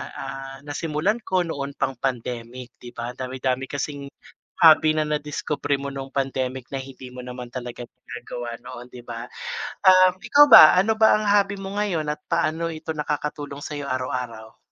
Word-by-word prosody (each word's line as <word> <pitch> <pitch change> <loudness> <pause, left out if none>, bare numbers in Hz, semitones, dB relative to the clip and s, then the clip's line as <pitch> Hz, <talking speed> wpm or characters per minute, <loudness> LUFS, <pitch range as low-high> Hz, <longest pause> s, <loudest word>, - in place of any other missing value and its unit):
ah, 135 0 -7
nasimulan 155 +8 -1
ko 185 -1 +1
noon 140 -4 -4
pang 135 - -1
pandemic, 125 -1 -4
'di 120 - -10
ba, 120 +1 -4
dami-dami 130 0 -2
kasing 140 0 -4 0.6
hobby 155 -1 +7
na 155 - +2
nadiskubre 150 -1 -2
mo 140 0 -4
nung 135 0 -7
pandemic 130 -2 -2
na 135 - -3
hindi 130 -1 -11
mo 125 - -9
naman 125 0 -7
talaga 120 -1 -6
ginagawa 120 0 -8
noon, 120 - -9
'di 125 - -10
ba? 115 0 -6 0.6
Ah, 185 0 +7
ikaw 240 +9 +6
ba, 155 - +11
ano 220 +4 +2
ba 220 0 +6
ang 215 - -3
hobby 200 0 +3
mo 195 +1 -6
ngayon 180 -7 -1
at 150 - -7
paano 160 +2 0
ito 160 0 -6
nakakatulong 150 -1 -4
sa'yo 145 -1 -5
araw-araw? 125 -4 -4
140 Hz, 165 wpm, -23 LUFS, 125-155 Hz, 0.6 s, ba